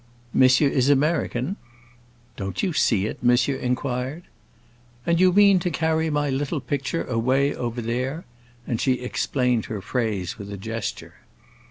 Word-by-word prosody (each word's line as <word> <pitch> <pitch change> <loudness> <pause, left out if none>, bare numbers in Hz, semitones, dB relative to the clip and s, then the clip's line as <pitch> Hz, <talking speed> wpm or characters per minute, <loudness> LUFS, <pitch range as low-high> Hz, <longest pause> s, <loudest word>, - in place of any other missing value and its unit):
"Monsieur 130 +2 +5
is 135 -1 +2
American?" 145 - +1 0.8
"Don't 95 -2 -4
you 185 - 0
see 105 -8 +2
it?" 110 - -5
monsieur 125 +3 +3
inquired. 130 +4 -2 0.8
"And 170 0 +2
you 185 0 +5
mean 200 0 +6
to 180 0 -1
carry 160 0 0
my 145 -1 0
little 145 +3 -1
picture 140 +5 -2
away 130 +4 +1
over 120 -1 -4
there?" 130 +8 -3 0.4
and 115 - -2
she 130 - +3
explained 125 -1 -1
her 110 - -5
phrase 105 -3 -2
with 100 0 -7
a 100 - -5
gesture. 115 +2 -5
130 Hz, 145 wpm, -24 LUFS, 120-150 Hz, 0.8 s, mean